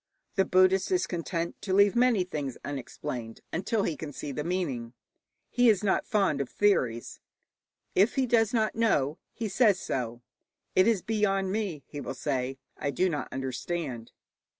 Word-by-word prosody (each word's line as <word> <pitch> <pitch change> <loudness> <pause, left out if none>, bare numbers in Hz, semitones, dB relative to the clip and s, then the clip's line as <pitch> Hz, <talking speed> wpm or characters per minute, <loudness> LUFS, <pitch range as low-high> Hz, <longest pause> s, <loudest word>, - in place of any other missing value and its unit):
The 190 -2 +2
Buddhist 185 +1 +4
is 365 -1 +2
content 170 -1 -3
to 190 -2 -1
leave 200 +1 +5
many 240 -5 +4
things 145 -7 -4
unexplained 125 -4 -5
until 200 +4 0
he 160 - -1
can 150 0 -6
see 145 - -6
the 150 +2 -3
meaning. 140 -10 -2 0.6
He 245 -1 +5
is 210 -2 +3
not 195 - +1
fond 195 -9 +2
of 135 - -4
theories. 125 - +1 0.7
If 200 +5 +3
he 265 - +2
does 230 -2 +3
not 220 -3 +1
know, 160 -11 +1
he 230 - -4
says 205 -2 +3
so. 120 -5 -3 0.5
'It 185 - +5
is 220 -6 +2
beyond 195 -3 +1
me,' 195 -9 -2
he 145 - -7
will 135 - -5
say; 130 -1 -2 0.2
'I 145 - -2
do 185 +7 +1
not 150 -4 -3
understand.' 130 -1 -4
180 Hz, 165 wpm, -28 LUFS, 140-205 Hz, 0.7 s, leave